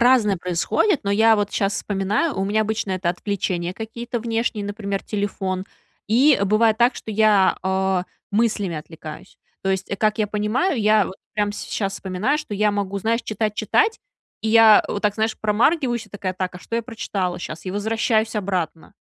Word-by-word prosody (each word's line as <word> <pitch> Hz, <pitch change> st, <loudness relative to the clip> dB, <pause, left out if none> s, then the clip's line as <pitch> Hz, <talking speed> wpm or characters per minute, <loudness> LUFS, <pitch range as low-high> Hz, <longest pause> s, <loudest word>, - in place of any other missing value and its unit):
разное 235 Hz, -5 st, +4 dB
происходит, 180 Hz, -, +1 dB
но 200 Hz, -, 0 dB
я 220 Hz, +2 st, +5 dB
вот 205 Hz, -1 st, -1 dB
щас 200 Hz, 0 st, 0 dB
вспоминаю, 205 Hz, -, -1 dB
у 195 Hz, -, +1 dB
меня 210 Hz, +2 st, +1 dB
обычно 215 Hz, -2 st, -2 dB
это 185 Hz, -2 st, -1 dB
отвлечения 180 Hz, -1 st, -2 dB
какие-то 235 Hz, +3 st, -5 dB
внешние, 225 Hz, -2 st, -1 dB
например, 200 Hz, -1 st, -3 dB
телефон, 195 Hz, -2 st, -3 dB, 0.4 s
и 260 Hz, +7 st, +5 dB
бывает 215 Hz, +2 st, +3 dB
так, 240 Hz, +2 st, +3 dB
что 220 Hz, -, -7 dB
я, 210 Hz, -3 st, +4 dB
о, 190 Hz, -1 st, +1 dB, 0.3 s
мыслями 205 Hz, -5 st, 0 dB
отвлекаюсь. 155 Hz, 0 st, -10 dB, 0.2 s
То 195 Hz, -, 0 dB
есть 190 Hz, 0 st, -2 dB
как 215 Hz, +1 st, +1 dB
я 215 Hz, -, +2 dB
понимаю, 220 Hz, -, 0 dB
я 210 Hz, -2 st, +4 dB
вот 185 Hz, -, -7 dB, 0.2 s
прям 205 Hz, -1 st, 0 dB
сейчас 195 Hz, -1 st, -3 dB
вспоминаю, 195 Hz, +11 st, -1 dB
что 300 Hz, -8 st, -7 dB
я 210 Hz, +1 st, +2 dB
могу, 200 Hz, -1 st, -2 dB
знаешь, 225 Hz, +4 st, 0 dB
читать, 215 Hz, 0 st, -2 dB
читать, 435 Hz, -, +1 dB, 0.4 s
и 220 Hz, -, -1 dB
я 225 Hz, -1 st, +7 dB
вот 205 Hz, -, -2 dB
так, 205 Hz, -1 st, +2 dB
знаешь, 220 Hz, +1 st, -1 dB
промаргиваюсь 240 Hz, +3 st, +1 dB
и -, -, -23 dB
такая: 190 Hz, -2 st, -4 dB
"Так, 185 Hz, -1 st, -3 dB
а -, -, -9 dB
что 230 Hz, -, -7 dB
я 230 Hz, -, -1 dB
прочитала 200 Hz, -6 st, -3 dB
щас?" 160 Hz, -2 st, -7 dB
И 185 Hz, -, -3 dB
возвращаюсь 220 Hz, +2 st, 0 dB
обратно. 180 Hz, -5 st, -3 dB
210 Hz, 180 wpm, -22 LUFS, 190-225 Hz, 0.4 s, я